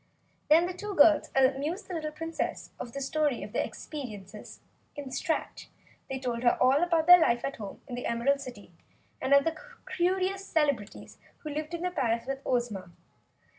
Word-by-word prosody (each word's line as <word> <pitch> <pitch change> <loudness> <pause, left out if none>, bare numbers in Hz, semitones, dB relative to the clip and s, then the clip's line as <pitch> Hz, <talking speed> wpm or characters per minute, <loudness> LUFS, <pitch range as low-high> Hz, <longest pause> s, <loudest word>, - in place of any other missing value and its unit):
Then 325 +3 +6
the 365 - -3
two 410 +2 -6
girls 310 -1 +6
amused 275 +8 +1
the 370 - -6
little 310 -2 -3
Princess 325 +2 -4
with 240 - -6
the 275 - -4
story 290 -1 0
of - - -9
their - - +1
experiences 215 - -8 0.4
in 290 - -6
the 260 - -8
Strat. 320 +5 -3 0.4
They 265 - -2
told 245 -3 -3
her 240 -1 +3
all 265 +4 +4
about 335 -2 +2
their 355 +1 +10
life 240 -7 +2
at 275 - -4
home 205 -3 -8
in 255 - -8
the 245 - -3
Emerald 275 +4 +1
City, 210 -8 -10 0.5
and 265 - -2
of 280 0 +7
the 325 +1 -1 0.4
curious 375 +2 +1
celebrities 285 - -1 0.2
who 305 - -5
lived 305 +3 -4
in 340 - -5
the 360 - 0
palace 235 -8 0
with 270 +1 -4
Ozma. 225 -7 -1
280 Hz, 185 wpm, -29 LUFS, 245-330 Hz, 0.5 s, their